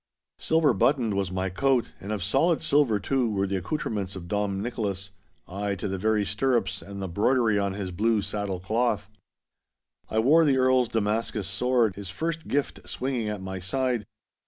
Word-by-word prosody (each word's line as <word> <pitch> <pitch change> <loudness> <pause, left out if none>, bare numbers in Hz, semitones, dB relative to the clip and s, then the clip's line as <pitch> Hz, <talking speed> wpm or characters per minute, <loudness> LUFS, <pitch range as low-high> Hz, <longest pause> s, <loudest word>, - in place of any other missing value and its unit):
Silver 160 -4 +3
buttoned 115 +1 +2
was 100 -1 -1
my 95 +1 -1
coat, 130 +5 +1
and 100 - -6
of 105 -4 -2
solid 160 - +2
silver, 140 -8 +3
too, 125 +4 0
were 100 -2 0
the 95 0 -1
accoutrements 100 - -3
of 90 -2 -7
Dom 100 0 -1
Nicholas—ay, 100 -2 -4
to 95 +2 -4
the 95 -1 -3
very 105 0 +2
stirrups 110 +2 0
and 100 0 -8
the 95 - -3
broidery 110 +3 +2
on 100 -1 0
his 95 -2 -4
blue 105 +3 +1
saddle 100 -3 -3
cloth. 110 +3 0 1.0
I 110 - -2
wore 145 +9 +5
the 140 -4 +3
Earl's 130 -2 +3
Damascus 105 -2 -1
sword, 115 +1 +1
his 100 -3 -6
first 165 - -3
gift, 145 0 -2
swinging 125 -4 -2
at 105 -2 -4
my 95 0 -5
side. 120 +3 -1
105 Hz, 170 wpm, -26 LUFS, 95-125 Hz, 1.0 s, wore